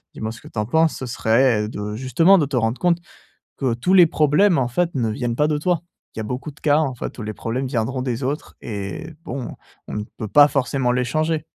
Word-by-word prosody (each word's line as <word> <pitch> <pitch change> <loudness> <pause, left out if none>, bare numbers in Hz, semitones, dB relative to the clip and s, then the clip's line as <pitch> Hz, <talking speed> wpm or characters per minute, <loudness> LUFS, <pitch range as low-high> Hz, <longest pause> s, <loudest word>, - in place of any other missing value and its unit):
Dis-moi 110 0 -4
ce 115 -1 -11
que - - -13
tu - - -12
en 105 - 0
penses. 160 +7 +2
Ce 130 - -5
serait 115 -2 +2
de, 105 -1 -5
justement, 135 - +4
de 145 - +1
te 140 - -4
rendre 115 0 0
compte 175 -2 +3 0.6
que 130 -4 0
tous 125 +11 0
les 180 -3 +8
problèmes 160 +5 +3
en 125 -3 +1
fait 170 +8 +1
ne 120 -5 0
viennent 115 +2 -2
pas 150 +3 +2
de 150 -1 0
toi. 175 +2 0 0.3
Il - - -9
y - - -1
a - - -3
beaucoup 125 +7 -5
de 145 - -19
cas, 145 -1 +3
en 150 -4 +1
fait, 120 - -6
où - - -5
les 105 0 -4
problèmes 120 +5 -3
viendront 130 0 -2
des 125 -1 -3
autres. 140 +4 -3
Et 100 - -5 0.2
bon, 130 -5 -5 0.3
on - - -5
ne 105 - -3
peut 110 - -4
pas 145 +6 +7
forcément 135 -3 0
les 125 0 +1
changer. 155 +4 -1
130 Hz, 250 wpm, -21 LUFS, 115-150 Hz, 0.6 s, les